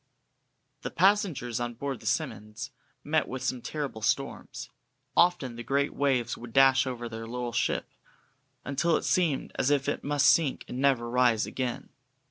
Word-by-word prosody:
The - - -4
passengers 180 - +2
on 120 0 -3
board 135 0 -4
the - - -8
"Simmonds" 105 +6 -3 0.3
met 155 +1 +1
with 130 0 -5
some 125 - -1
terrible 135 -3 -4
storms; - - -2 0.4
often 170 -9 +3
the 120 - -6
great 140 +2 0
waves 130 -5 +1
would 120 -1 -10
dash 135 0 +5
over 120 -2 -4
their 115 0 -7
little 120 0 -4
ship, - - 0 0.8
until 160 +4 +1
it - - -5
seemed 165 -7 +1
as 130 - +2
if 140 -1 +1
it 145 - -2
must 145 -1 +2
sink 155 -5 +3
and 125 - -5
never 135 -4 +2
rise 120 -2 +3
again. 125 -2 -4
130 Hz, 160 wpm, -28 LUFS, 120-145 Hz, 0.8 s, dash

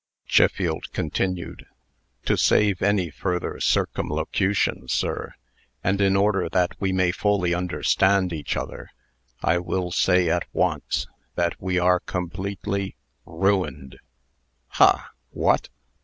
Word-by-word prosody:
Chiffield - - +2
continued: 90 +3 -3 0.6
"To - - +2
save 100 -3 +3
any 95 -4 +1
further 90 +4 -3
circumlocution, 95 -8 0
sir, - - -2 0.5
and 100 +1 +1
in 95 -1 +3
order 100 -3 +2
that 90 +1 +1
we 95 -1 +1
may 95 -1 +2
fully 95 -2 +1
understand 90 +1 +1
each 75 -3 -3
other, - - -6 0.5
I 85 - +3
will 90 0 -2
say 90 0 +3
at 85 +1 0
once, - - 0 0.3
that 85 -1 -1
we 95 -1 -1
are 90 0 +4
completely 95 +2 -4 0.3
ruined!" 95 -9 -1 0.7
"Ha! - - +3 0.2
What! - - +1
90 Hz, 110 wpm, -24 LUFS, 90-100 Hz, 0.7 s, are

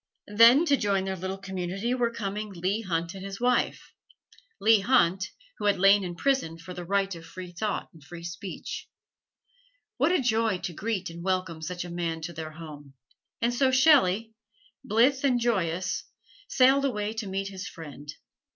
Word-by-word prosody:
Then 235 +8 +8
to 285 -4 +4
join 200 -3 0
their 190 0 -2
little 190 +1 -4
community 190 +4 -3
were 245 -2 +1
coming 210 -2 -4
Leigh 190 +4 -1
Hunt 170 -3 -2
and 190 -1 -8
his 195 0 -6
wife 245 0 0 0.7
Leigh 220 +1 +5
Hunt, 195 -4 +2 0.3
who - - -3
had 205 - +3
lain 195 +2 +5
in 175 -1 -5
prison 265 -7 0
for 165 +2 -9
the 175 - -6
right 195 +2 0
of 165 -1 -9
free 180 +1 -9
thought 210 +5 -3
and 160 -3 -17
free 170 +3 -10
speech. 175 +3 -6 1.1
What - - +3
a 365 - +3
joy 225 -5 +1
to 180 - -5
greet 195 -1 -3
and 170 +1 -9
welcome 185 -3 -1
such 175 +2 -4
a 175 - -8
man 170 -2 -2
to 170 +2 -5
their 155 -1 -7
home! 150 -4 -11 0.5
And 240 +1 +2
so 265 +2 +3
Shelley, 255 - +4 0.5
blithe 255 +6 +3
and 255 -3 +3
joyous, 185 -7 -1 0.4
sailed 270 +2 +4
away 210 -5 -1
to 220 -2 -4
meet 195 +1 -2
his 190 0 -7
friend. 145 -3 -9
195 Hz, 175 wpm, -27 LUFS, 175-230 Hz, 1.1 s, Then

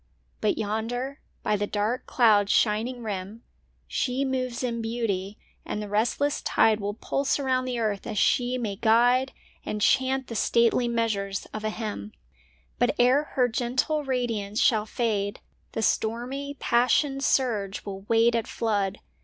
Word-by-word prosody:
But 215 - +1
yonder, 230 +6 -3 0.2
by 210 - +1
the 205 0 -1
dark 215 +5 -1
cloud's 210 -5 +4
shining 235 +3 +1
rim, 205 +1 -5 0.4
She 260 +1 -1
moves 255 -2 -2
in 235 -2 -2
beauty, 215 -4 -2 0.3
and - - -4
the 210 - -4
restless 235 +8 0
tide 220 -1 +3
Will 205 0 -3
pulse 275 +4 0
around 260 -2 0
the 250 -1 -2
earth 215 -4 -2
as 215 -3 -4
she 245 +5 +2
may 210 -5 -3
guide 245 +4 +3 0.3
And 210 - -3
chant 265 +4 +2
the 240 - -7
stately 235 +2 +2
measures 215 -4 -1
of 215 - -5
a 215 - 0
hymn. 210 - -5 0.7
But, - - +2
ere 255 +5 +4
her 250 -2 +4
gentle 255 +5 0
radiance 230 -6 -2
shall 220 -6 +3
fade, 210 -4 -1 0.3
The 225 - -2
stormy, 255 +7 -1
passioned 270 +3 +2
surge 215 -9 0
will 195 -1 -6
wait 230 +1 +4
at 230 -2 0
flood. 205 -3 -1
230 Hz, 150 wpm, -26 LUFS, 210-255 Hz, 0.7 s, cloud's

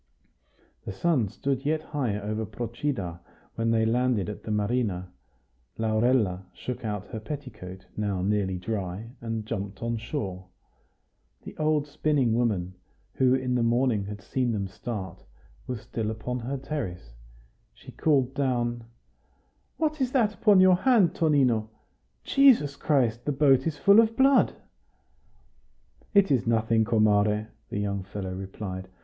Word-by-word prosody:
The - - -5
sun 130 - +1
stood 135 +6 -2
yet 155 +1 0
high 125 -9 -2
over 110 +2 -3
Procida 110 - -4 0.3
when 115 0 -1
they 110 -1 +3
landed 120 -3 +1
at 105 - -7
the - - -9
marina. 105 -4 -1 0.6
Laurella 110 -4 +1
shook 120 +9 -6
out 105 -2 -3
her 110 - -5
petticoat, 105 -8 -8
now 100 -3 -1
nearly 100 -2 0
dry, 100 +2 -4
and 115 -2 -4
jumped 100 -2 -5
on 115 0 -1
shore. 100 -6 -5 1.0
The - - -9
old 155 -1 +1
spinning 145 -5 +1
woman, 105 -7 0 0.4
who 130 -1 +3
in 130 -1 -1
the 125 - +1
morning 115 -3 +2
had 100 -1 -8
seen 125 -3 -1
them 100 -2 -2
start, 95 -1 -6 0.4
was 125 -4 -4
still 110 -1 -3
upon 125 +3 -4
her 130 +4 -3
terrace. 95 - -5 0.6
She - - -14
called 135 -4 +1
down, 120 -4 -1 0.9
"What 310 -2 -1
is 255 -1 0
that 225 -6 +3
upon 205 -2 +4
your 185 -1 +6
hand, 220 -4 +4
Tonino? 130 -9 +2 0.5
Jesus 250 - +4
Christ! 120 -7 +1
the 150 - +1
boat 135 0 +3
is 155 -2 -2
full 200 +6 +6
of 225 0 +3
blood!" 270 0 +4 1.6
"It 195 -5 +5
is 125 -4 +2
nothing, 115 -1 +2
comare," 105 -1 +2 0.2
the - - -4
young 100 -1 -2
fellow 95 0 -6
replied. 95 0 -6
115 Hz, 140 wpm, -27 LUFS, 105-140 Hz, 1.6 s, your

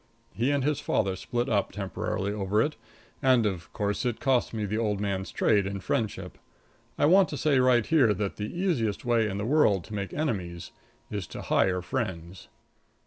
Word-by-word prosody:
He 120 +4 0
and 145 -2 +1
his 150 0 0
father 95 -2 0
split 120 +6 -2
up, 100 -6 0
temporarily, 100 0 -3
over 105 0 0
it, 150 +7 +1 0.5
and, 130 -4 +4
of 90 -6 -3
course, 105 -1 -2
it 120 -2 -1
cost 130 -3 +1
me 110 -2 -3
the 105 +2 -2
old 105 -3 0
man's 100 -2 -2
trade 100 -3 +2
and 100 -1 -5
friendship. 110 -3 -2 0.6
I - - +3
want 185 +4 +5
to 145 - -4
say 145 -3 +2
right 125 -2 +4
here 140 -9 +4
that 100 0 -2
the 105 0 -4
easiest 140 - -1
way 115 -3 +2
in 95 - -4
the 100 - -2
world 115 - +3
to 110 - -11
make 100 -2 -3
enemies 95 - -3 0.4
is 100 -4 -4
to - - -8
hire 90 -1 +1
friends. 90 -5 -4
105 Hz, 190 wpm, -27 LUFS, 100-130 Hz, 0.6 s, want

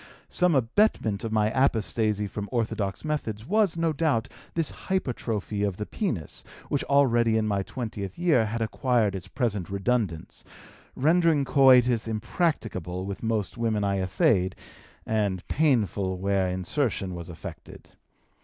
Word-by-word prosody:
"Some 180 -3 +2
abetment 120 - +1
of 115 - -3
my 110 0 +2
apostasy 110 -5 +1
from 105 0 -5
orthodox 110 -3 -2
methods 115 -8 -3
was, 200 - +2
no 165 -1 +1
doubt, 140 -7 0 0.3
this 165 -2 0
hypertrophy 115 - -3
of 100 -3 -1
the 105 - -3
penis, 110 - -4 0.3
which 140 - 0
already 120 -5 +3
in 110 - +1
my 100 -2 0
twentieth 100 -2 -5
year 155 -11 +3
had 115 +2 -3
acquired 115 -2 +1
its 95 -2 -6
present 105 -2 -2
redundance, 100 -4 -2 0.5
rendering 160 -1 +3
coitus 125 -4 +5
impracticable 110 - -2
with 100 0 -5
most 110 -2 -2
women 110 -3 0
I 100 -1 0
essayed 95 0 +2 0.5
and 100 -5 -1
painful 105 - +1
where 95 0 +1
insertion 95 - -1
was 85 -1 -7
effected. 85 - -10
110 Hz, 135 wpm, -26 LUFS, 100-135 Hz, 0.5 s, coitus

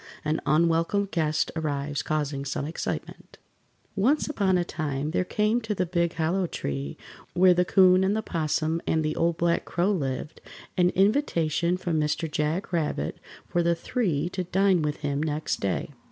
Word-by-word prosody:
AN 155 +1 0
UNWELCOME 165 +5 +2
GUEST 155 -2 0
ARRIVES 145 -2 -2
CAUSING 145 -2 -2
SOME 140 0 -3
EXCITEMENT 160 - -5 0.6
Once 255 +10 +2
upon 200 -10 +1
a 175 - 0
time 150 -3 -3
there 180 - +1
came 215 +5 +1
to 220 -2 -3
the 185 - 0
big 170 -1 0
Hollow 170 +3 0
Tree, 70 - -4 0.4
where 180 0 +6
the 180 +1 +2
'Coon 185 0 +5
and 195 +2 +2
the 220 - -1
'Possum 160 -2 -1
and 160 -1 +1
the 155 - -1
Old 170 0 +1
Black 170 0 +1
Crow 180 +4 0
lived, 140 -4 -3 0.3
an 180 -1 +4
invitation 180 - +2
from 170 -3 -1
Mr. 150 +2 0
Jack 155 +6 -1
Rabbit 150 - -1 0.3
for 175 - +1
the 170 0 +2
three 170 - -1
to 185 0 -3
dine 190 0 +2
with 150 -1 -1
him 145 -1 -1
next 155 0 -2
day. 100 +8 -2
170 Hz, 170 wpm, -26 LUFS, 150-185 Hz, 0.6 s, where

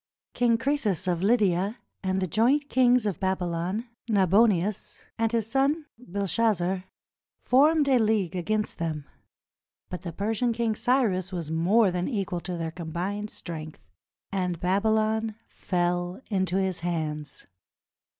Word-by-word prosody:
King 235 -2 +3
Croesus 245 - 0
of 175 -2 0
Lydia 200 -1 +2 0.2
and 190 0 0
the 190 - 0
joint 245 - +2
kings 250 -2 +4
of 205 -4 -2
Babylon, 185 +3 -1 0.2
Nabonius 200 -1 +2 0.2
and 225 -1 +2
his 230 -3 +1
son 275 +6 +1
Belshazzar, 195 -3 0 0.5
formed 290 +3 +4
a 260 -3 +4
league 215 -5 +1
against 210 +4 -1
them; 155 -3 -3 0.9
but 180 - -5
the 175 - -5
Persian 220 +6 0
King 230 -1 0
Cyrus 220 -6 +1
was 170 -4 -4
more 190 +6 +3
than 180 0 -2
equal 195 -7 -2
to 180 0 -4
their 165 -1 -3
com 165 -1 -7
bined 205 +5 -3
strength, 155 - -8 0.4
and 180 -3 -1
Babylon 220 +3 +1
fell 175 0 -2
into 190 -2 0
his 190 -2 0
hands. 155 -4 -4
195 Hz, 130 wpm, -27 LUFS, 175-225 Hz, 0.9 s, kings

